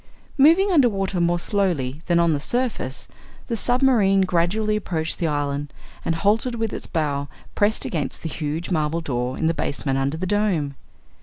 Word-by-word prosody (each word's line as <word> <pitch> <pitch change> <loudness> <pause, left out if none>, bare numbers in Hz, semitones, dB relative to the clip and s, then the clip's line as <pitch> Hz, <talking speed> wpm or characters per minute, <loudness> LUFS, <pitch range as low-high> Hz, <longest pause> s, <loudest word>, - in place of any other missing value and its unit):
Moving 335 +8 +6
under 280 -8 +5
water 195 -3 -1
more 170 0 +2
slowly 170 -8 -1
than 175 -1 +3
on 170 -1 +3
the 145 - 0
surface, 230 - -2 0.4
the 235 - -2
submarine 235 -5 +3
gradually 190 +4 +1
approached 160 -6 -2
the 170 - 0
island 145 -1 -2 0.3
and 165 - 0
halted 220 +8 +1
with 225 -2 -2
its - - -5
bow 145 -4 -1 0.3
pressed 210 +1 +1
against 155 -5 -4
the 165 - -3
huge 155 +3 -4
marble 160 0 0
door 125 -4 -2
in - - -1
the 165 - +3
basement 135 -3 -2
under 140 +3 -1
the 185 - -3
Dome. 185 -8 0
170 Hz, 170 wpm, -23 LUFS, 150-210 Hz, 0.4 s, Moving